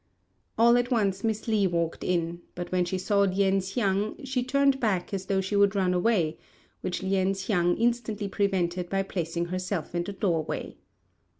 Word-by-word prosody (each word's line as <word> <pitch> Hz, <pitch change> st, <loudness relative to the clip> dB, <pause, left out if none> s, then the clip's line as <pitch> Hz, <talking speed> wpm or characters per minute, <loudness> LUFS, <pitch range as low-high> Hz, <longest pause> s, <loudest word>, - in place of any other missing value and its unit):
All 235 Hz, +2 st, +6 dB
at 245 Hz, 0 st, -1 dB
once 200 Hz, -6 st, +1 dB
Miss 220 Hz, 0 st, -1 dB
Li 210 Hz, -3 st, +3 dB
walked 170 Hz, -2 st, -2 dB
in, 170 Hz, -1 st, -1 dB
but 175 Hz, 0 st, -5 dB
when 180 Hz, -1 st, +2 dB
she 185 Hz, +2 st, -2 dB
saw 200 Hz, +2 st, +1 dB
Lien 195 Hz, 0 st, +3 dB
hsiang 195 Hz, +3 st, -1 dB
she 260 Hz, -1 st, -1 dB
turned 275 Hz, +1 st, +2 dB
back 200 Hz, -7 st, 0 dB
as 190 Hz, -1 st, -3 dB
though 195 Hz, -1 st, +1 dB
she 190 Hz, +2 st, -3 dB
would 200 Hz, 0 st, +4 dB
run 185 Hz, -2 st, +2 dB
away, 180 Hz, -4 st, +1 dB, 0.4 s
which 180 Hz, +1 st, -3 dB
Lien 190 Hz, 0 st, +1 dB
hsiang 180 Hz, -3 st, +1 dB
instantly 230 Hz, -3 st, 0 dB
prevented 185 Hz, -3 st, -1 dB
by 195 Hz, 0 st, 0 dB
placing 170 Hz, -2 st, -3 dB
herself 185 Hz, -1 st, -3 dB
in 175 Hz, 0 st, 0 dB
the 200 Hz, -, -6 dB
doorway. 175 Hz, -6 st, -2 dB
195 Hz, 175 wpm, -27 LUFS, 180-210 Hz, 0.4 s, All